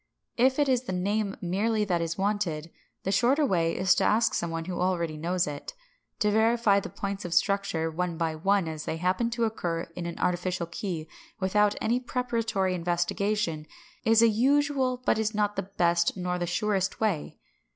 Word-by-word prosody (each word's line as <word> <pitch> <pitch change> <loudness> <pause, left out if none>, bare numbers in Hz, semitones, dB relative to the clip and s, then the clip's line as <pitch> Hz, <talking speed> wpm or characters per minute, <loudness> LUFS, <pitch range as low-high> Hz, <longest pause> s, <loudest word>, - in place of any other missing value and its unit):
If 260 +2 +3
it 290 -1 +3
is 255 -1 +1
the 190 - -3
name 200 +2 -1
merely 210 +4 0
that 175 -4 0
is 165 0 -2
wanted, 190 -6 -1 0.3
the 195 - -1
shorter 265 +8 +3
way 170 -8 +1
is 185 -1 +4
to - - +1
ask 225 +1 +3
some 170 - -1
one 165 0 -4
who 180 0 -4
already 170 -4 0
knows 175 +3 0
it. 145 - -7 0.5
To 210 - +3
verify 220 -1 +3
the - - -7
points 200 0 -4
of 175 -1 -3
structure 195 -6 +1
one 175 0 -2
by 165 -1 0
one 195 +3 +1
as 155 -1 -5
they 160 - -2
happen 185 +7 0
to 235 0 -2
occur 175 -7 -2
in 175 -1 -4
an 170 - -6
artificial 180 0 -1
key, 170 -2 -5 0.3
without 205 +2 +2
any 235 +3 +1
preparatory 230 -7 -1
investigation, 175 -1 -1 0.4
is 225 -1 +5
a - - +7
usual 260 +2 +2
but - - +2
is 220 0 -1
not 205 -1 +1
the 190 - -4
best 170 +1 +2
nor 180 0 -2
the 175 - -2
surest 195 +1 0
way. 205 -9 -1
195 Hz, 185 wpm, -27 LUFS, 170-220 Hz, 0.5 s, a